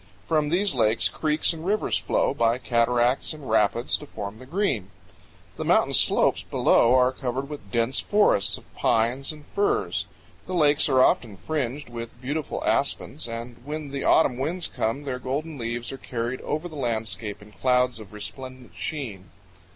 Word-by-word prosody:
From 155 Hz, -2 st, +1 dB
these 190 Hz, +4 st, +2 dB
lakes 110 Hz, -3 st, +2 dB
creeks 155 Hz, +1 st, 0 dB
and 160 Hz, -1 st, -8 dB
rivers 210 Hz, +4 st, +1 dB
flow, -, -, +1 dB
by 115 Hz, +1 st, +2 dB
cataracts 120 Hz, +2 st, +1 dB
and 150 Hz, -3 st, -10 dB
rapids, 110 Hz, +2 st, +2 dB
to 150 Hz, -, -11 dB
form 105 Hz, -3 st, -7 dB
the 130 Hz, -, -12 dB
Green. 140 Hz, -, 0 dB, 0.7 s
The -, -, -3 dB
mountain -, -, +3 dB
slopes -, -, +4 dB
below 120 Hz, +2 st, +4 dB
are 125 Hz, 0 st, +5 dB
covered 130 Hz, +1 st, -3 dB
with 140 Hz, -10 st, -9 dB
dense 115 Hz, +3 st, +1 dB
forests 105 Hz, -, +3 dB
of -, -, -15 dB
pines 120 Hz, +6 st, +1 dB
and 150 Hz, -1 st, -12 dB
firs. 420 Hz, +1 st, 0 dB, 0.4 s
The 185 Hz, -, -3 dB
lakes 150 Hz, -3 st, +4 dB
are 130 Hz, -1 st, +5 dB
often 110 Hz, -6 st, +2 dB
fringed 145 Hz, +1 st, -3 dB
with 115 Hz, 0 st, -7 dB
beautiful 145 Hz, +4 st, -3 dB
aspens, 80 Hz, -, 0 dB
and 115 Hz, +1 st, -6 dB
when 150 Hz, 0 st, -5 dB
the 140 Hz, 0 st, -3 dB
autumn 125 Hz, -6 st, +4 dB
winds 165 Hz, +6 st, -1 dB
come 115 Hz, +6 st, -2 dB
their 130 Hz, -3 st, -3 dB
golden 145 Hz, +4 st, -3 dB
leaves 120 Hz, 0 st, -3 dB
are 135 Hz, -, -7 dB
carried 120 Hz, +1 st, -3 dB
over 155 Hz, +4 st, -2 dB
the 160 Hz, -, -11 dB
landscape 110 Hz, -5 st, -2 dB
in 105 Hz, +1 st, -15 dB
clouds 125 Hz, +2 st, +2 dB
of 105 Hz, -4 st, -11 dB
resplendent 130 Hz, +4 st, -7 dB
sheen. 115 Hz, -, -5 dB
130 Hz, 165 wpm, -25 LUFS, 115-150 Hz, 0.7 s, are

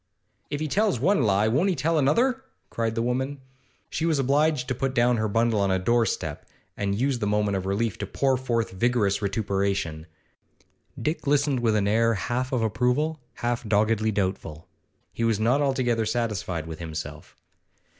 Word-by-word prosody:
'If 145 Hz, -, -3 dB
he 155 Hz, -, -2 dB
tells 200 Hz, -, +1 dB
one 175 Hz, -, +3 dB
lie, 105 Hz, -2 st, +3 dB
won't 145 Hz, -, +2 dB
he 185 Hz, -, +1 dB
tell 160 Hz, +3 st, +1 dB
another?' 245 Hz, -, +2 dB, 0.3 s
cried 115 Hz, -1 st, -1 dB
the 115 Hz, -, 0 dB
woman. 130 Hz, +3 st, -2 dB, 0.5 s
She 160 Hz, -, -4 dB
was 165 Hz, -2 st, +2 dB
obliged 140 Hz, 0 st, +2 dB
to -, -, +1 dB
put 130 Hz, +1 st, -2 dB
down 120 Hz, 0 st, +3 dB
her 110 Hz, 0 st, 0 dB
bundle 115 Hz, +1 st, +1 dB
on 100 Hz, -1 st, +2 dB
a 95 Hz, -, +2 dB
doorstep, 115 Hz, +3 st, -1 dB, 0.3 s
and 100 Hz, 0 st, -2 dB
used 130 Hz, -1 st, +1 dB
the 105 Hz, -, -1 dB
moment 105 Hz, -1 st, +1 dB
of 95 Hz, 0 st, -3 dB
relief 105 Hz, +1 st, -1 dB
to 100 Hz, -, -3 dB
pour 135 Hz, +5 st, +1 dB
forth 120 Hz, -3 st, -1 dB
vigorous 105 Hz, 0 st, +1 dB
vituperation. 100 Hz, -5 st, -1 dB, 0.9 s
Dick 155 Hz, -1 st, -2 dB
listened 145 Hz, -2 st, +2 dB
with 115 Hz, -2 st, +2 dB
an 100 Hz, -1 st, +1 dB
air 115 Hz, +2 st, +3 dB
half 125 Hz, +5 st, -2 dB
of 125 Hz, -4 st, 0 dB
approval, 125 Hz, +8 st, 0 dB, 0.3 s
half 120 Hz, 0 st, 0 dB
doggedly 110 Hz, 0 st, +2 dB
doubtful. 95 Hz, -6 st, -3 dB, 0.5 s
He 115 Hz, -, -3 dB
was 115 Hz, -3 st, +2 dB
not 120 Hz, +6 st, +2 dB
altogether 125 Hz, -5 st, +1 dB
satisfied 105 Hz, -8 st, -2 dB
with 80 Hz, -1 st, -7 dB
himself. 80 Hz, -2 st, -7 dB
115 Hz, 175 wpm, -25 LUFS, 100-135 Hz, 0.9 s, one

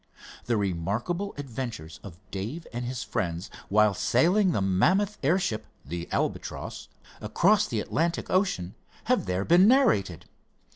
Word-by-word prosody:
The 120 Hz, -2 st, +1 dB
remarkable 105 Hz, -, -2 dB
adventures 120 Hz, -, -6 dB
of 90 Hz, -5 st, -10 dB
Dave 110 Hz, -, -5 dB
and 120 Hz, +1 st, -3 dB
his 125 Hz, 0 st, -4 dB
friends 85 Hz, +1 st, -3 dB, 0.2 s
while 105 Hz, 0 st, +4 dB
sailing 175 Hz, -, +3 dB
the -, -, 0 dB
mammoth 180 Hz, -, +2 dB
airship, 145 Hz, -, 0 dB, 0.2 s
the 85 Hz, +4 st, -6 dB
Albatross, -, -, -3 dB, 0.3 s
across 185 Hz, -, +3 dB
the 115 Hz, -, -2 dB
Atlantic 165 Hz, +8 st, -1 dB
Ocean 185 Hz, -, 0 dB, 0.3 s
have -, -, +1 dB
there 90 Hz, +2 st, -1 dB
been 180 Hz, +4 st, +6 dB
narrated. 160 Hz, -, +3 dB
120 Hz, 130 wpm, -27 LUFS, -, 0.3 s, been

